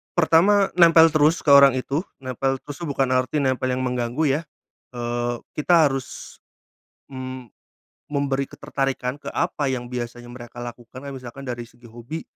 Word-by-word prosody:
Pertama, 185 +4 +4
nempel 165 -1 +7
terus 155 +2 +3
ke 145 - +3
orang 140 -2 +8
itu, 140 +6 -2 0.2
nempel 135 +1 -1
terus 145 - -8
tuh 170 - -5
bukan 135 -2 0
arti 130 +3 +1
nempel 130 -1 0
yang 130 - -2
mengganggu 125 +3 -1 0.2
ya. - - -7 0.5
Eee, 120 0 -2 0.2
kita 155 -1 +4
harus, 135 -1 -7 0.7
mmm, 130 -1 -7 0.6
memberi 140 -2 -1
ketertarikan 135 -1 -3
ke - - -8
apa 160 -4 -1
yang 125 -2 -2
biasanya 120 -1 -6
mereka 120 -1 -10
lakukan. 120 +1 -9
Kayak 140 -1 -7
misalkan 125 +1 -9
dari 120 -1 -4
segi 120 0 -18
hobi, 120 +8 -7
130 Hz, 155 wpm, -23 LUFS, 120-145 Hz, 0.7 s, orang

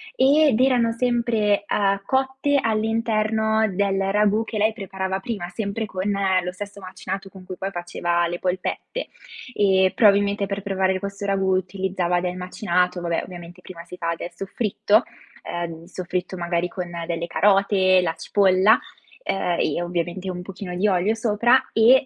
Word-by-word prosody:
ed 285 - +4
erano 250 -3 +3
sempre, 230 -4 +1
uhm, 200 -1 +1
cotte 270 +2 +1
all'interno 220 0 +1
del 195 0 +1
ragù 210 +1 +2
che 225 - -5
lei 215 +1 +2
preparava 190 -1 -4
prima, 200 -4 -4
sempre 215 +2 -3
con 195 0 -3 0.3
lo 180 - -3
stesso 200 +1 -8
macinato 190 +1 -6
con 190 -1 -14
cui 185 - -7
poi 195 +1 -4
faceva 175 -1 -1
le 175 +1 -4
polpette. 185 - -3 0.5
E 190 -3 +3
probabilmente 200 -1 +4
per 200 0 -4
preparare 190 -1 0
questo 200 +1 -5
ragù 195 -1 +1
utilizzava 185 -1 -1
del 180 0 -3
macinato; 180 -1 -1
vabbè, 170 -1 -1
ovviamente 175 0 -10
prima 170 -2 -10
si 180 +1 -11
fa 170 -1 -1
del 175 - -6
soffritto, 205 +4 +1 0.4
uhm, 170 -1 -5
il 170 - -16
soffritto 185 0 -4
magari 170 0 -1
con 180 -1 -5 0.2
delle 170 0 -3
carote, 195 -1 +3
la 165 -2 -1
cipolla, 195 +4 +3 0.4
ehm 175 - -1
e 155 +3 0
ovviamente 175 +2 -3
un 180 - -6
pochino 185 0 -7
di 205 +4 +2
olio 190 +2 +2
sopra 235 +3 +3
e, 250 +4 +6
195 Hz, 155 wpm, -23 LUFS, 180-215 Hz, 0.5 s, e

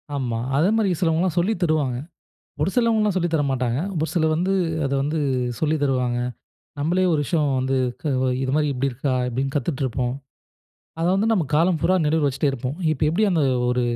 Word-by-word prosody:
ஆமா. 120 -4 -2 0.2
அதே 165 +6 +3
மாரி 215 -3 +2
சிலவங்கலாம் 170 +1 +1
சொல்லி 190 +6 +1
தருவாங்க. 150 -7 +1 0.6
ஒரு 150 - +1
சிலவங்கலாம் 220 -4 +2
சொல்லி 175 -1 +1
தர 155 - +2
மாட்டாங்க. 125 -1 -1 0.2
ஒரு 160 - 0
சிலர் 160 -2 +2
வந்து 180 +4 0 0.3
அத 135 - -2
வந்து 150 +3 -1 0.4
சொல்லி 155 0 +1
தருவாங்க. 125 -3 +1 0.6
நம்பளே 175 +6 +1
ஒரு 155 - +1
விஷயம் 150 -1 +1
வந்து 130 +1 0 0.2
க - - -31 0.4
"இது 130 - -1
மாரி 150 0 +2
இப்படி 135 +2 0
இருக்கா?" 130 +2 -2 0.2
இப்டீன்னு 135 +2 -2
கத்துட்ருப்போம். 130 -3 -1 0.9
அத 165 - +1
வந்து 205 +3 +1
நம்ம 190 -7 +2
காலம் 165 +2 +3
பூரா 185 - +2
நினைவுல 155 -1 +2
வச்சுட்டே 140 +2 0
இருப்போம். 130 +2 -4 0.2
இப்ப 155 - -6
எப்படி 180 +8 +2
அந்த 165 -4 +2 0.3
ஒரு 125 0 +1
150 Hz, 175 wpm, -23 LUFS, 130-175 Hz, 0.9 s, அதே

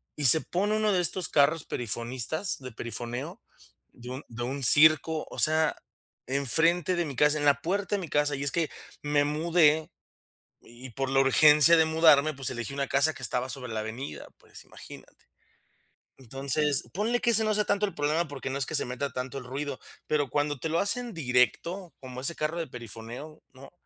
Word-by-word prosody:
y 145 - -3
se 145 +6 +10
pone 205 +4 -2
uno 215 -2 +1
de 180 - +1
estos 175 0 0
carros 150 +2 +2
perifonistas, 120 - -2
de 130 -2 -9
perifoneo, 120 +2 -6 0.5
de 125 +1 -12
un 130 +2 -7
de 120 +1 -6
un 135 +2 -4
circo, 155 +4 +5
o - - -8
sea, 155 +1 +2 0.5
enfrente 160 +6 +1
de 175 -1 -1
mi 140 -3 -7
casa, 150 +1 +3
en 145 - -2
la 140 -1 +3
puerta 200 +4 -2
de - - -2
mi 170 - -6
casa, 145 -1 +1
y 140 - -5
es 140 - -1
que, 165 -3 -1 0.3
me 145 0 +1
mudé 155 0 +1 0.7
y 120 +2 -13
por 135 +2 -4
la 135 0 +2
urgencia 150 +4 +6
de 160 - +4
mudarme, 155 -2 +4
pues 135 -1 -3
elegí 120 +2 -6
una 140 -1 -3
casa 140 +3 +1
que 135 - -13
estaba 125 +2 -2
sobre 125 -3 -6
la 110 - -3
avenida, 115 +6 -7
pues - - -15
imagínate. - - -15 0.9
Entonces, 135 +3 -1
ponle 230 +5 -1
que 235 - +1
ese 220 -1 +4
no 215 -1 0
sea 210 - +1
tanto 205 +1 0
el 195 - -8
problema 155 +3 -1
porque 135 -2 -7
no 135 - -3
es 135 - -1
que 155 - -7
se - - +2
meta 130 +3 -5
tanto 130 +2 -5
el 125 - -9
ruido, 140 +1 -5 0.3
pero 145 -4 -1
cuando 145 -1 -1
te 160 - -3
lo 165 - 0
hacen 240 +3 -1
directo, 165 +7 -1
como 130 -1 -9
ese 150 +5 -2
carro 155 +3 -3
de 165 - -3
perifoneo, 120 +6 -9
¿no? 135 +4 -15
145 Hz, 200 wpm, -27 LUFS, 130-160 Hz, 0.9 s, se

